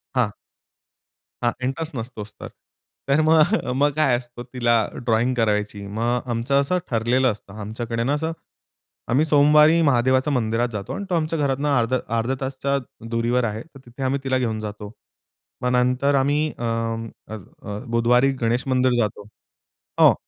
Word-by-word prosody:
हां. 120 -5 +2 1.1
हां. 120 - +3
इंटरेस्ट 145 +3 -3
नसतोच 110 -3 -6
तर. - - -6 0.6
तर 140 +3 +3
मग 160 +4 +4 0.3
मग 145 - +5
काय 155 -5 +3
असतं, 120 0 -9
तिला 120 -2 +2 0.2
ड्रॉइंग 120 +1 +1
करायची. 105 -3 0
मग 105 +3 -5 0.2
अ, - - -9
आमचं 125 +4 +1
असं 180 +6 0
ठरलेलं 125 +3 +2
असतं. 100 -2 -11
आमच्याकडे 115 +2 -3
ना 135 +4 +1
असं, 160 +2 -1 0.8
आम्ही 140 +6 +2
सोमवारी 150 +2 +5
महादेवाच्या 130 -1 +3
मंदिरात 115 0 +1
जातो 105 +3 -5
आणि 200 - -4
तो 180 - +1
आमच्या 160 -1 -1
घरातून 140 0 0
अर्धा 130 -3 +2 0.2
अर्धा 115 +4 0
तासाच्या 135 +1 -1 0.3
दुरीवर 120 +2 +1
आहे. 110 -1 -2
तर 155 -4 -17
तिथे 120 +3 -8
आम्ही 135 +1 0
तिला 130 -1 +1
घेऊन 115 -4 -1
जातो. 105 -1 -7 0.7
मग 125 - 0
नंतर 125 +3 +2
आम्ही 145 +3 +2
अ, 120 - -6 0.7
अ, - - -4 0.5
बुधवारी 120 +3 +3
गणेश 120 +3 0
मंदिर 130 -1 +2
जातो. 105 -1 -3 0.7
हो. - - +8
125 Hz, 155 wpm, -23 LUFS, 115-140 Hz, 1.1 s, हो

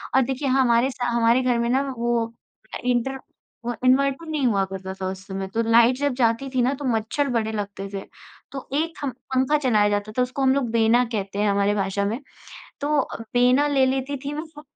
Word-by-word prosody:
और 265 - +6
देखिए 265 +2 -2
हमारे 255 -1 +3
सा 250 -1 -4
हमारे 235 +1 +3
घर 250 -1 +2
में 235 - 0
ना 260 +2 +2 0.2
वो 235 -1 0 0.5
इंटर 250 +2 0 0.5
वो 240 - -1
इन्वर्टर 275 +4 +3
नहीं 300 -4 -1
हुआ 200 -4 +2
करता 190 0 -6
था 190 - -1
उस 190 0 -9
समय। 190 -1 -4
तो 230 - +1
लाइट 235 +2 +6
जब 285 -1 0
जाती 240 +2 +1
थी 260 -1 0
ना 255 +3 +2
तो 280 0 -6
मच्छर 230 +4 0
बड़े 225 -3 0
लगते 200 -2 -5
थे। 195 - -3 0.5
तो 270 -1 -7
एक 325 +3 0
हम 280 - -1 0.2
पंखा 260 +3 +3
चलाया 220 -8 +2
जाता 205 +1 -1
था 250 - +3
उसको 255 +2 -2
हम 265 -1 +4
लोग 270 -3 0
बेना 230 +2 +4
कहते 200 -1 -3
हैं 210 0 +2
हमारे 200 +1 +2
भाषा 195 0 -1
में। 220 +5 -2 0.6
तो 290 +1 +2 0.3
बेना 250 +4 +4
ले 275 -2 +3
लेती 265 +2 -1
थी 285 - -3
मैं 310 - -4
फ 295 - -9
245 Hz, 210 wpm, -23 LUFS, 215-270 Hz, 0.6 s, और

